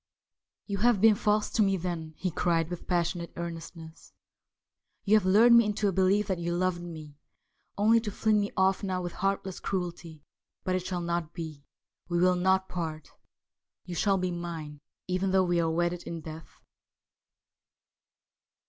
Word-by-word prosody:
' -, -, -65 dB
You 200 Hz, -2 st, -3 dB
have 235 Hz, -1 st, +4 dB
been 220 Hz, +2 st, +6 dB
false 210 Hz, +1 st, +1 dB
to -, -, +1 dB
me, 195 Hz, -2 st, +3 dB
then,' 165 Hz, -3 st, -5 dB
he 185 Hz, -, -2 dB
cried 165 Hz, 0 st, 0 dB
with 175 Hz, -, -6 dB
passionate 175 Hz, -1 st, -1 dB
earnestness. 165 Hz, -1 st, -8 dB, 0.5 s
' -, -, -52 dB
You 210 Hz, +1 st, +5 dB
have 205 Hz, -4 st, +3 dB
lured 225 Hz, +5 st, +6 dB
me 235 Hz, 0 st, +8 dB
into 210 Hz, 0 st, 0 dB
a -, -, +2 dB
belief 190 Hz, +3 st, +2 dB
that 190 Hz, -3 st, -2 dB
you 170 Hz, 0 st, -2 dB
loved 180 Hz, -1 st, 0 dB
me, 155 Hz, -4 st, -9 dB, 0.6 s
only 220 Hz, +3 st, +5 dB
to 225 Hz, -2 st, -4 dB
fling 215 Hz, +1 st, +2 dB
me 205 Hz, 0 st, -1 dB
off 190 Hz, 0 st, +3 dB
now 190 Hz, -2 st, -2 dB
with 175 Hz, -, -4 dB
heartless 195 Hz, -1 st, -2 dB
cruelty. 170 Hz, -4 st, -4 dB, 0.4 s
But 185 Hz, -, -1 dB
it 185 Hz, -, -1 dB
shall 180 Hz, -2 st, -2 dB
not 170 Hz, -2 st, -2 dB
be. 155 Hz, -4 st, -7 dB, 0.4 s
We 175 Hz, -, 0 dB
will 180 Hz, +1 st, +4 dB
not 190 Hz, +1 st, +2 dB
part. 160 Hz, -4 st, -5 dB, 0.7 s
You 180 Hz, -, -6 dB
shall 195 Hz, +3 st, +2 dB
be 185 Hz, -1 st, -1 dB
mine, 165 Hz, -4 st, -6 dB, 0.3 s
even 185 Hz, +1 st, 0 dB
though 190 Hz, 0 st, +4 dB
we 175 Hz, -1 st, +1 dB
are 165 Hz, -, +1 dB
wedded 175 Hz, +1 st, 0 dB
in 165 Hz, -1 st, -5 dB
death.' 160 Hz, +1 st, -10 dB
180 Hz, 175 wpm, -28 LUFS, 170-195 Hz, 0.7 s, me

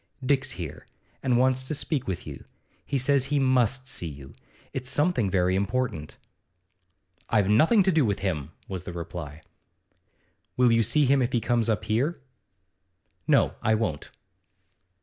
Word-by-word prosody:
'Dick's 135 Hz, 0 st, +1 dB
here, 85 Hz, -5 st, -7 dB, 0.3 s
and 125 Hz, -2 st, +2 dB
wants 130 Hz, +1 st, +2 dB
to 140 Hz, +4 st, -3 dB
speak 140 Hz, -2 st, -2 dB
to 95 Hz, -, 0 dB
you. 70 Hz, -2 st, -8 dB, 0.4 s
He 140 Hz, -, -2 dB
says 135 Hz, 0 st, +2 dB
he 145 Hz, +2 st, 0 dB
must 130 Hz, -1 st, +2 dB
see 90 Hz, -, -2 dB
you; 70 Hz, -3 st, -10 dB, 0.4 s
it's 130 Hz, -1 st, -4 dB
something 140 Hz, -, +1 dB
very 90 Hz, -1 st, +1 dB
important.' 100 Hz, -6 st, -2 dB, 1.1 s
'I've 105 Hz, -4 st, +2 dB
nothing 165 Hz, -, +5 dB
to 190 Hz, -, +2 dB
do 160 Hz, -4 st, +3 dB
with 100 Hz, -4 st, 0 dB
him,' 75 Hz, -8 st, -3 dB, 0.2 s
was 95 Hz, -3 st, -6 dB
the 90 Hz, -, -6 dB
reply. 85 Hz, -3 st, -7 dB, 1.1 s
'Will 125 Hz, -1 st, +4 dB
you 115 Hz, 0 st, +4 dB
see 145 Hz, +7 st, +3 dB
him 135 Hz, +1 st, +3 dB
if 125 Hz, 0 st, -1 dB
he 120 Hz, -, +3 dB
comes 115 Hz, -1 st, 0 dB
up 110 Hz, -, 0 dB
here?' 130 Hz, +10 st, 0 dB, 1.1 s
'No, -, -, +3 dB
I 110 Hz, -, +2 dB
won't. 110 Hz, -10 st, -3 dB
120 Hz, 155 wpm, -26 LUFS, 95-135 Hz, 1.1 s, nothing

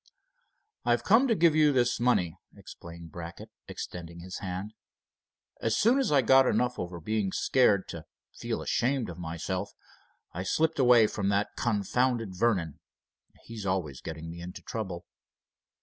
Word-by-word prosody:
"I've 120 Hz, 0 st, +1 dB
come 230 Hz, -, +5 dB
to 230 Hz, -, +2 dB
give 170 Hz, -3 st, +4 dB
you 155 Hz, -1 st, +5 dB
this 125 Hz, -3 st, +1 dB
money," 95 Hz, -9 st, +2 dB, 0.2 s
explained 85 Hz, -1 st, -11 dB
Brackett, 85 Hz, -1 st, -9 dB, 0.2 s
extending 85 Hz, -1 st, -7 dB
his 90 Hz, +2 st, -7 dB
hand. 95 Hz, +3 st, -5 dB, 0.9 s
"As 115 Hz, 0 st, +1 dB
soon 240 Hz, +5 st, +4 dB
as 270 Hz, -, 0 dB
I 140 Hz, -3 st, +4 dB
got 130 Hz, +2 st, +6 dB
enough 125 Hz, 0 st, 0 dB
over 85 Hz, -1 st, -5 dB
being 105 Hz, +2 st, -1 dB
scared 105 Hz, -6 st, +2 dB
to 85 Hz, -2 st, -7 dB, 0.3 s
feel -, -, -4 dB
ashamed 125 Hz, -4 st, 0 dB
of 85 Hz, -, -11 dB
myself, 80 Hz, -2 st, -4 dB, 0.6 s
I 90 Hz, -, -4 dB
slipped 160 Hz, -, 0 dB
away 120 Hz, -3 st, +6 dB
from 100 Hz, -2 st, -1 dB
that 100 Hz, +1 st, +1 dB
confounded 115 Hz, 0 st, 0 dB
Vernon. 90 Hz, -8 st, 0 dB, 0.6 s
He's 110 Hz, -4 st, -7 dB
always 85 Hz, -8 st, -2 dB
getting 80 Hz, 0 st, -7 dB
me 85 Hz, 0 st, -9 dB
into 90 Hz, +1 st, -9 dB
trouble." 95 Hz, -6 st, -5 dB
105 Hz, 150 wpm, -29 LUFS, 85-125 Hz, 0.9 s, got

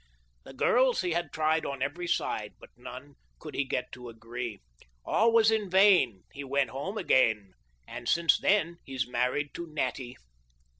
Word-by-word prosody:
The -, -, -11 dB
girls 250 Hz, -, +3 dB
he 180 Hz, -2 st, -2 dB
had 170 Hz, -2 st, -2 dB
tried 160 Hz, 0 st, +1 dB
on 140 Hz, -2 st, -3 dB
every 170 Hz, +6 st, -3 dB
side. 105 Hz, -9 st, -2 dB
But -, -, -15 dB
none 130 Hz, +3 st, -11 dB, 0.2 s
could 155 Hz, -, -10 dB
he 140 Hz, -, 0 dB
get 125 Hz, -1 st, -3 dB
to 125 Hz, -1 st, -9 dB
agree; 115 Hz, 0 st, -6 dB, 0.5 s
All 230 Hz, +1 st, +3 dB
was 225 Hz, -1 st, +5 dB
in 215 Hz, -3 st, 0 dB
vain, 185 Hz, -, +4 dB
he 140 Hz, -, -7 dB
went 140 Hz, -2 st, 0 dB
home 145 Hz, +11 st, -5 dB
again, 110 Hz, -, +2 dB, 0.3 s
And -, -, -6 dB
since 170 Hz, 0 st, +3 dB
that 170 Hz, -4 st, +1 dB
he's 130 Hz, -3 st, -3 dB
married 125 Hz, +4 st, -1 dB
to 170 Hz, -, -6 dB
Natty. 130 Hz, -4 st, -4 dB
140 Hz, 165 wpm, -29 LUFS, 125-175 Hz, 0.5 s, was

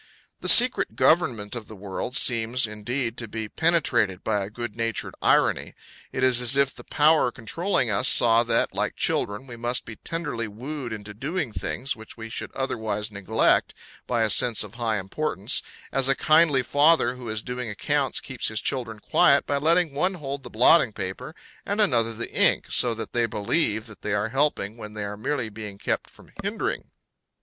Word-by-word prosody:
The -, -, +1 dB
secret 250 Hz, +1 st, +6 dB
government 125 Hz, -11 st, +2 dB
of 115 Hz, -3 st, -6 dB
the 110 Hz, -, -10 dB
world 100 Hz, +6 st, -4 dB
seems, 115 Hz, +1 st, +2 dB
indeed, 115 Hz, +3 st, -4 dB
to 115 Hz, -, -2 dB
be 110 Hz, 0 st, -5 dB
penetrated 120 Hz, -, +1 dB
by 105 Hz, -2 st, 0 dB
a 95 Hz, -, -6 dB
good 115 Hz, -1 st, -6 dB
natured 115 Hz, -1 st, -3 dB
irony; -, -, +2 dB, 0.4 s
it 130 Hz, -, -3 dB
is 125 Hz, -1 st, +4 dB
as 125 Hz, +3 st, +3 dB
if 140 Hz, -1 st, +2 dB
the -, -, -11 dB
Power 150 Hz, -4 st, +3 dB
controlling 135 Hz, -, -1 dB
us 100 Hz, +6 st, +2 dB
saw 115 Hz, -1 st, +5 dB
that, 120 Hz, -, 0 dB
like -, -, -2 dB
children, 105 Hz, +6 st, -1 dB
we 120 Hz, -3 st, -10 dB
must 120 Hz, +2 st, -1 dB
be 115 Hz, -, -9 dB
tenderly 150 Hz, -9 st, -4 dB
wooed 125 Hz, +4 st, -7 dB
into 105 Hz, -1 st, -7 dB
doing 140 Hz, -, -3 dB
things 130 Hz, +5 st, -3 dB
which 110 Hz, 0 st, -10 dB
we 115 Hz, 0 st, -8 dB
should -, -, -5 dB
otherwise 110 Hz, -5 st, -3 dB
neglect, 100 Hz, +3 st, +1 dB, 0.3 s
by 120 Hz, -2 st, +1 dB
a 110 Hz, -, +1 dB
sense 115 Hz, +2 st, +3 dB
of 105 Hz, -1 st, -11 dB
high 115 Hz, -2 st, -1 dB
importance, 100 Hz, +2 st, -1 dB, 0.3 s
as 135 Hz, -1 st, +3 dB
a 135 Hz, -, +4 dB
kindly 155 Hz, -4 st, +4 dB
father 145 Hz, -1 st, +3 dB
who 125 Hz, -2 st, -9 dB
is 110 Hz, -1 st, -3 dB
doing 125 Hz, -1 st, -5 dB
accounts 140 Hz, +7 st, 0 dB
keeps 130 Hz, -3 st, -3 dB
his 110 Hz, -1 st, +1 dB
children 120 Hz, -5 st, -3 dB
quiet 140 Hz, +5 st, +3 dB
by 140 Hz, -, -1 dB
letting 165 Hz, +1 st, +2 dB
one 180 Hz, +7 st, 0 dB
hold 140 Hz, -4 st, -5 dB
the -, -, -10 dB
blotting 120 Hz, +3 st, +4 dB
paper 95 Hz, -, -6 dB, 0.3 s
and 205 Hz, +2 st, -3 dB
another 120 Hz, -, +3 dB
the 120 Hz, +1 st, -6 dB
ink, -, -, +3 dB
so 120 Hz, -2 st, +2 dB
that 110 Hz, -, -7 dB
they 120 Hz, -1 st, +1 dB
believe 110 Hz, +1 st, 0 dB
that 105 Hz, -4 st, -11 dB
they 105 Hz, -, -3 dB
are 105 Hz, +2 st, -1 dB
helping 130 Hz, -5 st, 0 dB
when 105 Hz, -2 st, -9 dB
they 105 Hz, -, -4 dB
are 100 Hz, 0 st, -5 dB
merely 120 Hz, +3 st, -2 dB
being 105 Hz, -2 st, -9 dB
kept -, -, -2 dB
from -, -, -19 dB
hindering. -, -, -3 dB
120 Hz, 190 wpm, -24 LUFS, 110-140 Hz, 0.4 s, secret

